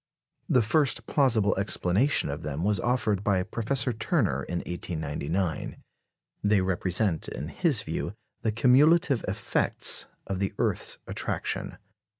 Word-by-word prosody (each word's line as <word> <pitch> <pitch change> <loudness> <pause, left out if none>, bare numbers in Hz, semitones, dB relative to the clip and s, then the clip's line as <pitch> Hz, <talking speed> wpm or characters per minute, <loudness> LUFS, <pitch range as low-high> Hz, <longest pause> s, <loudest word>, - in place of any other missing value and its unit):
The 125 - +4
first 140 +5 +1
plausible 115 -8 +2
explanation 100 - +1
of 70 - -5
them 75 +2 -4
was 105 0 +1
offered 110 -5 0
by 95 -3 +2
Professor 120 +4 0
Turner 110 - 0
in 85 -1 -3
1899. 80 0 -3 0.7
They 105 -1 +4
represent, 95 -1 0
in 75 - -5
his 145 - +2
view, 85 +4 -4 0.3
the 110 - 0
cumulative 140 +5 +4
effects 95 - 0 0.2
of 95 -1 -3
the 100 0 -2
earth's - - -1
attraction. - - -2
105 Hz, 125 wpm, -27 LUFS, 90-125 Hz, 0.7 s, The